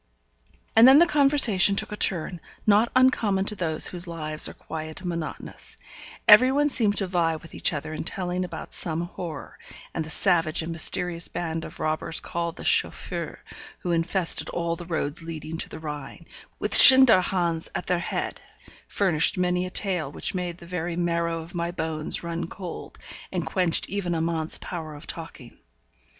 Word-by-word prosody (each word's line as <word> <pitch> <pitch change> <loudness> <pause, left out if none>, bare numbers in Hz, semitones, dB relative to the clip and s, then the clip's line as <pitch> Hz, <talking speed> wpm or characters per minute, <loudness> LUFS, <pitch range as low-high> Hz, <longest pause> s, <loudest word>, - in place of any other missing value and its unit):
And 225 +2 +8
then 265 +2 +8
the 340 - +7
conversation 275 - +4
took - - -2
a - - -4
turn, 175 -3 +1 0.3
not 215 +2 +3
uncommon 220 -7 +2
to 210 - -2
those 160 -5 +1
whose 180 0 -2
lives 155 -2 -2
are - - -12
quiet 155 +1 -8
and 180 - -4
monotonous; 170 -2 -7 0.5
every 245 +5 +8
one 290 +2 +1
seemed 210 -7 +1
to 195 - +1
vie 170 -3 0
with 160 +1 -12
each - - +1
other 155 0 -5
in 155 - -5
telling 180 +1 -3
about 170 -3 -8
some 165 -1 -2
horror; 170 -3 -8 0.3
and 165 - -3
the 155 - -8
savage 165 -3 +1
and 165 - -5
mysterious 170 +1 +1
band 165 -1 -4
of - - -11
robbers 155 +1 -2
called 170 -1 -4
the - - -10
Chauffeurs, - - 0 0.4
who 175 - -3
infested 170 +1 +2
all 170 -1 -2
the 170 0 -10
roads 155 -3 -3
leading 160 -1 -7
to - - -2
the - - -8
Rhine, 150 +1 -8 0.3
with - - -1
Schinderhannes 185 -10 +7
at - - -3
their 180 -1 0
head, - - -4 0.5
furnished 180 -6 +1
many 180 0 0
a - - -7
tale 180 -7 -2
which - - -3
made 180 -2 -4
the 170 - -14
very 175 -1 -4
marrow 170 -1 -1
of 165 +2 -12
my 170 -1 -3
bones 160 -3 -3
run 170 0 -4
cold, 180 -1 -9 0.3
and - - -3
quenched 180 -4 +1
even 180 -3 -3
Amante's 160 -1 -1
power 160 -4 -7
of 145 - -12
talking. - - -8
170 Hz, 175 wpm, -25 LUFS, 160-185 Hz, 0.5 s, And